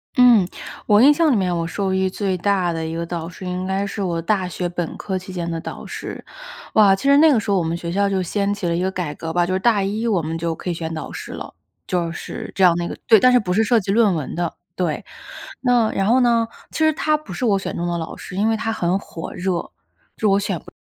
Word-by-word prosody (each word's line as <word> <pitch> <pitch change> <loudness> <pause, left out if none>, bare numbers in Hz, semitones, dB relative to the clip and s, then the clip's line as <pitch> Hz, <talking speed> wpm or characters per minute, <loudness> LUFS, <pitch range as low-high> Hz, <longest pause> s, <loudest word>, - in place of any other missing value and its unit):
嗯， 240 -8 +6 0.4
我 210 0 +6
印 285 +4 +8
象 315 -1 +3
里 - - +3
面 180 -3 +1
我 165 0 -1
受 195 +1 -2
益 190 0 +1
最 190 -1 -1
大 185 -1 +1
的 165 - -3
一 160 +1 -4
个 170 0 -3
导 165 -1 -4
师， 185 +1 -10
应 180 +1 -3
该 195 +1 0
是 200 - -5
我 170 -3 -1
大 190 0 0
学 180 +1 -3
本 175 -1 -4
科 190 -2 -3
期 185 +1 -8
间 170 -2 -3
的 165 -1 -3
导 - - -7
师。 - - -7 0.5
哇， 200 -3 +6
其 195 - -9
实 280 +1 +5
那 315 0 +7
个 245 - +4
时 205 - -3
候 200 - +3
我 175 - +1
们 165 +1 -1
学 170 -1 -5
校 200 +2 +1
就 190 -1 0
掀 200 +3 -1
起 200 -2 -5
了 170 - 0
一 175 - -1
个 190 - +1
改 180 -6 -3
革 165 +2 -5
吧， 175 +1 +2
就 185 - -2
是 190 - +1
大 215 -2 +3
一 215 +4 -1
我 200 -6 +2
们 160 +1 -3
就 165 0 -2
可 180 - -6
以 - - -1
选 165 -1 -5
导 155 -2 -6
师 - - -7
了， - - -8 0.3
就 170 -2 -1
是 170 - -7
这 190 - +2
样 175 -2 +7
那 175 - -2
个 - - -6
对， 220 -2 +7
但 255 +5 +5
是 250 - +5
不 185 -5 -2
是 220 +4 +3
涉 235 +1 +3
及 195 -1 -3
论 210 -4 +4
文 155 -4 -4
的， 170 -1 -2 0.2
对， 170 -5 -2 0.6
那 245 -3 +3
然 195 - 0
后 245 +4 +4
呢， 235 -2 +3 0.2
其 - - -7
实 315 0 +4
他 305 0 +1
不 295 -11 -10
是 215 - -5
我 205 -5 +3
选 - - -5
中 175 - -2
的 175 0 -1
老 160 -1 -5
师， - - -9
因 210 +2 +2
为 225 - +2
她 225 +1 -2
很 180 -4 0
火 165 -4 -8
热， 180 - -7
就 180 - 0
我 170 - -5 0.8
选 170 - -3
不 - - -14
190 Hz, 300 characters per minute, -21 LUFS, 170-215 Hz, 0.8 s, 印